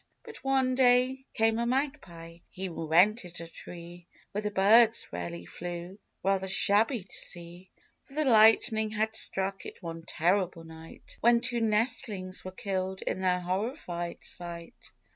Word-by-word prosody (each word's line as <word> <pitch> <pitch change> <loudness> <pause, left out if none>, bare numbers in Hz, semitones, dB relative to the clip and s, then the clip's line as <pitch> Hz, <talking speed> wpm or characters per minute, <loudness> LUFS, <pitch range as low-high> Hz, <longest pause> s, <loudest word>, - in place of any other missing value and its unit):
But, 455 -2 -11
one 265 -1 +2
day 255 +1 +3
came 225 0 +2
a 235 - 0
Magpie; 235 - -3
he 190 0 -5
rented 175 +3 +2
a 170 - -7
tree 170 +1 -11 0.2
Where 205 - -3
the 210 - -2
birds 220 +4 +5
rarely 85 0 -6
flew, 175 - -7
— - - -48
rather 190 0 +1
shabby 210 +4 +3
to 185 - -13
see, 175 +2 -4 0.2
— - - -45
For 275 - -16
the 310 0 +1
lightning 220 -2 +5
had 220 +1 -1
struck 195 -2 -2
it - - -11
one 165 -1 -6
terrible 175 +1 0
night, 160 0 -12
When 235 +1 +5
two 240 -1 0
nestlings 215 -4 0
were 185 - -6
killed 190 -2 -3
in 190 - -3
their 180 -1 +1
horrified 180 - -4
sight. 170 -1 -7
195 Hz, 155 wpm, -29 LUFS, 175-230 Hz, 0.2 s, birds